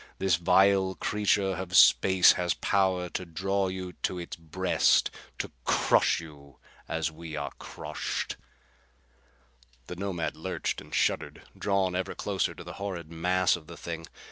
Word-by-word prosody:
This 95 -4 +2
vile 95 +2 +4
creature 100 +2 +1
of 90 -1 0
space 95 +1 +7
has 90 -3 0
power 95 +2 +1
to 90 - -4
draw 95 +3 -1
you 95 -1 -5
to 90 - -1
its 85 -1 -6
breast, 90 +3 +2 0.3
to - - -4
crush - - +3
you 70 -4 -13 0.3
as 80 0 -1
we 80 0 -8
are 70 -1 -4
crushed." - - -4 1.5
The 90 - -7
Nomad 90 -3 -3
lurched - - -3
and - - -15
shuddered, - - 0
drawn 95 -2 0
ever 95 +1 -2
closer 100 -3 -1
to - - -9
the - - -8
horrid 85 -5 -5
mass 90 +2 +2
of 80 -3 -11
the 85 - -10
thing. 85 -1 -6
90 Hz, 145 wpm, -28 LUFS, 85-95 Hz, 1.5 s, space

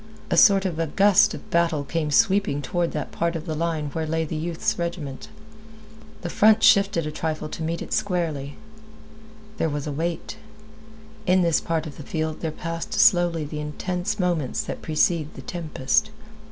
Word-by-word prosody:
A - - +3
sort 195 -2 +6
of 170 -4 -2
a 165 - 0
gust 205 +5 +4
of - - -11
battle 165 -3 +2
came 155 +2 -2
sweeping 195 -2 +3
toward 175 +2 -1
that 150 -3 -4
part 170 0 -1
of 160 - -5
the 160 - -3
line 155 -2 -2
where 160 -1 -2
lay 160 +1 0
the 160 - -5
youth's 165 +2 -2
regiment. 165 -6 -4 1.0
The 175 - -3
front 220 +1 +4
shifted 200 -6 +4
a 155 - -3
trifle 155 0 -3
to 160 - -7
meet 165 +1 -2
it - - -6
squarely. 160 -7 -1 1.0
There 165 - 0
was 145 -1 -3
a 150 - -3
wait. 165 +8 -3 0.9
In 185 0 +4
this 170 -2 +2
part 165 -1 -2
of 150 - -9
the - - -8
field 155 +1 -3
there 160 - -1
passed 165 +1 -5
slowly 175 -3 +4
the 150 +1 -6
intense 180 +7 -3
moments 170 -8 0
that - - -6
precede 155 0 0
the - - -9
tempest. 175 +5 0
165 Hz, 180 wpm, -24 LUFS, 155-180 Hz, 1.0 s, sort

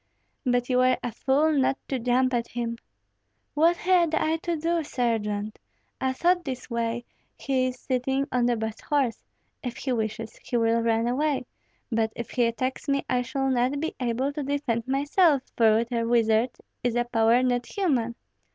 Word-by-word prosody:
"But 245 0 +2
you 250 -1 +2
were 255 0 +4
a 245 - -2
fool 275 +7 +2
not 270 -2 +2
to 265 - -1
jump 255 +2 +2
at 235 -1 0
him." 235 -1 -3 0.8
"What 330 +3 +4
had 350 -3 +3
I 320 +1 +1
to 340 +1 -2
do, 330 +1 0
Sergeant? 215 -6 -2 0.4
I 260 0 +1
thought 350 +5 +2
this 260 -4 -6
way: 235 0 -2 0.3
he 260 -2 0
is 250 -1 -5
sitting 265 +2 -1
on 245 -1 +2
the 240 - +2
best 220 -1 -4
horse; 275 -6 0 0.4
if 245 -3 -5
he 265 - -3
wishes, 220 -1 -3
he 245 - -1
will 230 0 +2
run 230 0 +1
away, 275 +1 0 0.5
but 225 -1 +1
if 235 - -6
he 245 - +2
attacks 255 +5 -3
me 275 0 +1
I 250 -1 +1
shall 270 +2 -1
not 255 +3 +1
be 320 +2 -2
able 255 +3 -1
to 295 - -3
defend 270 -5 -1
myself, 285 +2 +3
for 220 -2 +5
with 230 +2 0
a 230 -1 0
wizard 230 0 +3 0.3
is 245 -1 0
a 240 - +2
power 235 +1 +3
not 245 -1 0
human! 255 - 0
250 Hz, 180 wpm, -26 LUFS, 230-275 Hz, 0.8 s, for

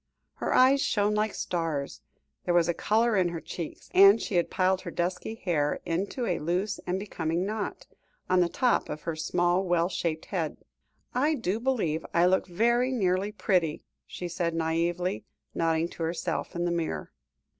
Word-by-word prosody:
Her - - -2
eyes 265 +2 +5
shone 210 -4 +1
like 210 0 0
stars, 165 -5 -3 0.4
there 175 - +1
was 170 -1 +4
a 170 - +2
colour 225 +5 +2
in 185 -3 +3
her 170 -1 -4
cheeks, 165 -1 -7
and 195 +3 +8
she - - -4
had 175 -2 +2
piled 185 0 +1
her - - -6
dusky 175 +5 -2
hair 160 -9 0
into 195 +9 -2
a - - 0
loose 180 +6 -1
and 180 +1 0
becoming 170 -3 -2
knot, 210 0 -4 0.4
on 185 - +3
the 175 -1 +3
top 250 +6 +1
of 150 - -6
her 165 -1 -3
small, 175 +3 +1
well 175 -1 +1
shaped 165 -4 -2
head. 165 -5 -1 0.6
"I 295 +5 +2
do 225 -9 -1
really - - -13
believe 180 -12 0
I 170 +1 +5
look 190 +1 +2
very 235 +7 +2
nearly 195 -4 +1
pretty," 180 -7 0 0.2
she 180 - -6
said 170 -1 -2
naïvely, 165 -3 -1 0.3
nodding 165 0 +1
to - - -11
herself 165 +1 -2
in 175 0 -1
the 175 - 0
mirror. 170 -2 -3
175 Hz, 175 wpm, -28 LUFS, 165-205 Hz, 0.6 s, and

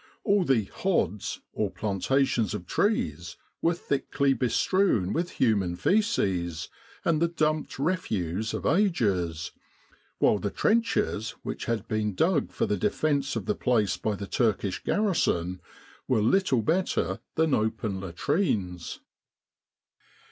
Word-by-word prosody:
All 200 -2 +3
the 130 -9 +2
"hods," 105 - -1
or 105 - 0
planta 110 +7 +1
tions 115 -7 -1
of 90 - -6
trees, 85 - -1 0.2
were 170 +1 +2
thickly 140 -3 0
bestrewn 125 - +1
with 170 +2 -1
human 100 -8 +1
fseces 95 - 0 0.4
and 160 -2 +2
the 170 - +4
dumped 155 -2 -1
refuse 110 - -1
of - - -5
ages; 100 - +1 0.7
while 105 - +3
the 100 - -2
trenches 210 - 0
which - - -4
had 115 -2 -2
been 105 -2 -1
dug 160 - +2
for - - 0
the 105 - 0
defence 140 - 0
of 110 -5 -3
the - - +1
place 110 -6 +1
by 110 -2 -2
the 100 - -6
Turkish 105 -3 0
garrison 90 - 0 0.5
were 115 -5 +2
little 135 - +3
better 175 - 0 0.2
than 160 -2 +2
open 110 -3 0
latrines. 95 - -2
115 Hz, 125 wpm, -27 LUFS, 95-165 Hz, 0.7 s, the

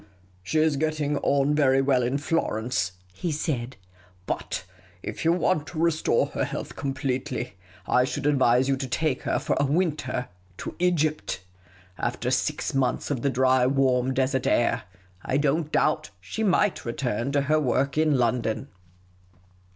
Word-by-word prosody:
" 95 - -32
She 95 +12 -2
is 155 -2 +3
getting 150 -1 0
on 140 +1 +2
very 135 -3 +4
well 135 -2 +3
in 125 +3 0
Florence," 120 - -1 0.2
he 165 - -3
said; 135 -5 -2 0.3
" 90 0 -30
but - - -3 0.4
if - - -5
you 165 - +4
want 170 -3 +1
to 165 - -8
restore 165 -1 +2
her - - -2
health - - -5
completely, 130 -4 -3 0.3
I 125 - +3
should 145 +1 -4
advise 130 -3 +4
you 135 - +2
to 135 0 -4
take 140 +1 0
her - - 0
for - - -1
a 145 - +3
winter 145 -6 0 0.3
to - - -6
Egypt. 155 - 0 0.6
After - - -1
six - - 0
months 135 +1 0
of 130 -5 -1
the 140 - +1
dry, 130 -1 +3
warm, 130 -1 +2
desert 130 0 0
air, 120 - +2 0.4
I 130 - 0
don't 150 +2 +1
doubt - - +1
she 220 - -4
might 205 0 +2
return 120 +1 -2
to 145 - +3
lier 155 +3 +2
work 135 -1 +1
in 155 -1 +3
lyondon." 120 +1 0
135 Hz, 160 wpm, -26 LUFS, 125-155 Hz, 0.6 s, very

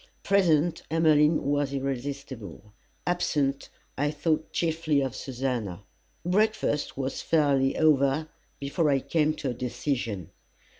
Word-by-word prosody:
Present, 175 -5 +3
Emmeline 155 -1 +4
was 145 0 0
irresistible; 135 -7 -5 0.3
absent, 150 -6 0 0.3
I 145 +1 +2
thought 155 +1 -1
chiefly 160 -3 +1
of 135 -2 -2
Susannah. 120 -8 -3 0.4
Breakfast 195 -7 +1
was 135 0 -3
fairly 140 -4 +2
over 150 0 +3 0.3
before 145 +3 0
I 140 - +4
came 155 +2 +1
to 135 -4 -3
a - - -3
decision. 120 - -3
145 Hz, 110 wpm, -27 LUFS, 135-155 Hz, 0.4 s, Emmeline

